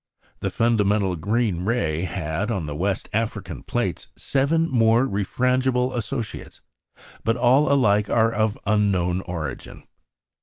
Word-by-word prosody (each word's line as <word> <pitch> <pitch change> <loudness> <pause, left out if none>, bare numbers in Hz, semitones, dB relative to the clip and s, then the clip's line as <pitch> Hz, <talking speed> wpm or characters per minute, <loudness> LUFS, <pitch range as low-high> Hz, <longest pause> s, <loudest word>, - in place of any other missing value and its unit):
The - - -2
fundamental 105 -4 +1
green 100 +1 -1
ray 85 -8 0
had, 90 +2 -3
on 95 -8 -2
the 75 - -5
West 95 +5 -2
African 100 - -3
plates, - - -3
seven 155 +5 +1
more 115 -2 +3
refrangible 125 +4 0
associates; 115 -1 -5 0.6
but 115 +2 +1
all 130 +4 +4
alike 105 -7 +3
are 115 0 +3
of 110 -1 0
unknown 95 -4 +1
origin. 80 -7 -6
105 Hz, 120 wpm, -23 LUFS, 95-120 Hz, 0.6 s, all